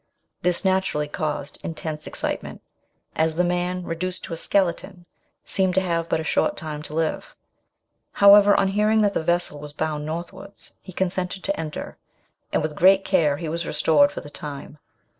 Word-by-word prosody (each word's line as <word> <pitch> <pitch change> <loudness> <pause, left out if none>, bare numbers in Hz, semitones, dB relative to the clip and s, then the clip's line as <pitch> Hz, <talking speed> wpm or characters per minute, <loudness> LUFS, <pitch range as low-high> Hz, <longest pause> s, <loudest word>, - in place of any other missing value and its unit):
Thi 180 - +3
naturally 190 -6 +1
caused 150 -1 -4
intense 155 -2 -5
excitement, - - -3 0.5
as 160 0 +1
the 180 - +2
man, 180 +1 -1
reduced 180 +2 -4
to - - -6
a - - -2
skeleton, 175 +1 -1 0.4
seemed 190 -2 +1
to 190 - +4
have 170 -2 -1
but - - +1
a - - -3
short - - +1
time 150 -1 -5
to 150 0 -8
live. 160 -1 -2 0.8
However, 200 0 +7
on 195 - +2
hearing 210 +2 +2
that 205 -1 +2
the - - 0
vessel 170 -2 0
was 145 0 -8
bound 155 -1 -2
northwards, 170 +5 -7
he 185 - -11
consented 185 +1 -2
to 295 - -1
enter, 155 -2 -6 0.5
and - - +1
with 155 -1 -2
great 190 +3 +5
care 150 -3 +2
he 165 - -5
was 165 +2 -3
restored 145 -3 +3
for - - -6
the 145 - -11
time. 145 0 -8
170 Hz, 175 wpm, -23 LUFS, 155-190 Hz, 0.8 s, However